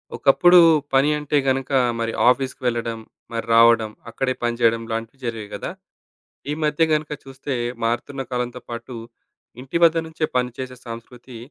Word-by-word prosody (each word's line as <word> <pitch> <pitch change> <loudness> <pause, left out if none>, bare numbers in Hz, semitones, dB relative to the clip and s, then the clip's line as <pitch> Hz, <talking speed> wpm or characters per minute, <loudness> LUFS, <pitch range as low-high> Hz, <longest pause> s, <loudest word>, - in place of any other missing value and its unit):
ఒకప్పుడు 175 +6 +6 0.3
పని 135 +2 +4
అంటే 150 0 0
గనుక 135 +1 0 0.3
మరి 115 0 -2 0.2
ఆఫీస్‌కి 130 +1 -1
వెళ్ళడం, 115 -1 -2 0.3
మరి 115 - -3
రావడం, 115 -1 +5 0.2
అక్కడే 130 +2 -1
పనిచేయడం 115 -1 +2
ఇలాంటివి 115 +3 -5
జరిగేవి 110 -3 -5
గదా! - - -5 0.8
ఈ - - 0
మధ్య 150 +1 +1
గనక 150 0 -2
చూస్తే, 135 +1 -6 0.3
మారుతున్న 120 +4 -2
కాలంతో 125 0 -3
పాటు 120 +1 -7 0.7
ఇంటి 135 +5 -2
వద్ద 165 -1 +6
నుంచే 160 0 -4
పనిచేసే 125 +1 -3
సంస్కృతి 120 +2 -10
125 Hz, 135 wpm, -22 LUFS, 115-135 Hz, 0.8 s, ఒకప్పుడు